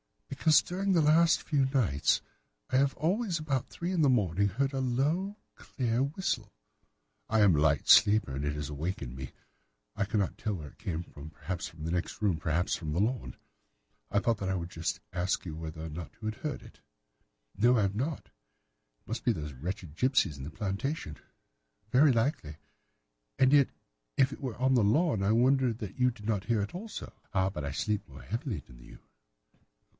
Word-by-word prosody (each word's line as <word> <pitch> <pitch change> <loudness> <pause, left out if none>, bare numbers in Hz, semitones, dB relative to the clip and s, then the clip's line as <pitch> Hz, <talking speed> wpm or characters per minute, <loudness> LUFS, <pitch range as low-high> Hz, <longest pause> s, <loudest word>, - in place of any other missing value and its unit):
"'Because 155 +3 +4
during 190 +2 -1
the 170 - +4
last 165 +3 +4
few 140 -4 +2
nights 120 - +2 0.5
I 130 - +3
have 135 0 +2
always, 185 +4 0
about 145 -5 -1
three 175 +2 -4
in 180 -3 +1
the 145 - +5
morning, 100 -5 +2
heard 135 +8 -1
a 135 - -1
low, 150 - 0 0.2
clear 120 -3 -2
whistle. 140 - -2 0.8
I 110 0 +3
am 100 -5 +6
a - - +2
light 75 -1 +2
sleeper, 105 -9 +6
and 70 - -3
it 75 0 -1
has 75 -2 -4
awakened 75 -4 -4
me. 65 -1 -7 0.6
I - - 0
cannot 100 -2 -1
tell 105 -2 -1
where 75 -5 -7
it - - -22
came 85 -2 -3
from—perhaps 80 +4 -6
from 80 -2 -11
the 80 - -2
next 90 0 -2
room, 100 -6 +1
perhaps 80 +3 0
from 75 -3 -4
the 85 - 0
lawn. 120 +5 -1 0.7
I 100 - 0
thought 115 +2 +2
that 95 - -2
I 95 - +1
would 85 -1 -4
just 80 -2 -3
ask 90 +2 -1
you 80 -3 -5
whether 80 0 -6
you 85 +7 -8
had 110 0 -2
heard 150 -1 -4
it.' - - -15 0.8
"'No, 120 +4 +4
I 105 - +3
have 100 0 0
not. 140 +7 -2 0.8
It - - -42
must - - -4
be - - +3
those 75 -1 -6
wretched 85 +3 -6
gipsies 115 - +2
in - - -6
the 70 - -5
plantation.' 100 - -3 0.7
"'Very 140 +3 +6
likely. 115 - 0 0.8
And 130 +1 +4
yet 140 -2 +6 0.5
if 135 0 +4
it - - -10
were 130 -5 -3
on 130 +1 +2
the 120 -4 +4
lawn, 115 - +2
I 100 +2 +3
wonder 130 +2 +4
that 110 -1 -7
you 125 0 +5
did 105 -4 -10
not 105 -3 -1
hear 115 -4 +1
it 100 - -6
also.' 210 +5 -7 0.2
"'Ah, 95 0 +2
but 75 -6 -5
I 70 - -3
sleep 105 +8 -2
more 65 -2 -12
heavily 115 - -3
than - - -16
you. - - -13
105 Hz, 195 wpm, -30 LUFS, 85-135 Hz, 0.8 s, am